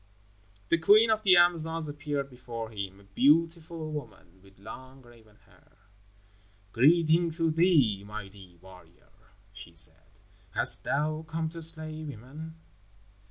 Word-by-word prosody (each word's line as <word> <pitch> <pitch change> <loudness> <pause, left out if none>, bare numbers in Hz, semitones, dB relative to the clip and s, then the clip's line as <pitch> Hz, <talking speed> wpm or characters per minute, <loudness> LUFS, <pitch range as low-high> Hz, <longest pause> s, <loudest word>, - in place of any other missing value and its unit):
The 170 - +2
queen 215 +7 +5
of 215 0 +1
the 190 -4 +5
Amazons 165 -2 +3
appeared 145 -1 -4
before 120 -3 -8
him, 100 -2 -7
a - - -19
beautiful 160 - 0
woman, 95 - -10
with 95 0 -21
long 130 +6 -12
raven 115 -3 -20
hair. - - -26 0.9
"Greeting 165 +7 +3
to 165 -1 0
thee, 155 - +2
mighty 100 -3 -11
warrior," 90 -1 -19 0.4
she 95 -4 -13
said. 80 -2 -3 0.4
"Hast - - +3
thou 155 +2 -1
come 160 0 -3
to 165 +1 -9
slay 155 -1 0
women?" 150 +4 -10
145 Hz, 125 wpm, -28 LUFS, 100-160 Hz, 0.9 s, queen